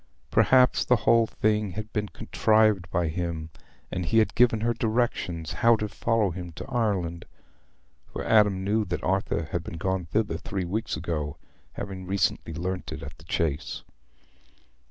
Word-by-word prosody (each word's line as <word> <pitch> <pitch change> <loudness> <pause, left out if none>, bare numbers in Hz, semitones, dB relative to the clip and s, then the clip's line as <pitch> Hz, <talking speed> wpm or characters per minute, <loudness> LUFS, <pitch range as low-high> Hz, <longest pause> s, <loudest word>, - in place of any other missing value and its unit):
Perhaps 130 -1 +4
the 125 - +5
whole 115 -1 +4
thing 105 -3 0
had 110 +2 -6
been 105 -2 -1
contrived 110 -5 +2
by 85 0 0
him, 80 -1 -3 0.4
and 90 - -2
he 85 +7 +1
had 110 - +4
given 115 -3 +4
her 120 +1 +1
directions 110 -8 -1
how 115 +7 +4
to 105 -1 -2
follow 110 -1 +1
him 90 0 -6
to - - -7
Ireland—for 95 -8 -5
Adam 105 -4 +4
knew 105 +3 +1
that 90 -2 -4
Arthur 95 -3 0
had 85 - -2
been 85 - -7
gone 95 0 -1
thither 105 +6 0
three 95 -4 -4
weeks 100 0 -2
ago, 75 -3 -3 0.4
having 95 -2 -6
recently 90 -4 0
learnt 90 +3 -3
it - - -6
at - - -8
the 75 - -16
Chase. 80 -3 -2
95 Hz, 155 wpm, -27 LUFS, 85-110 Hz, 0.4 s, the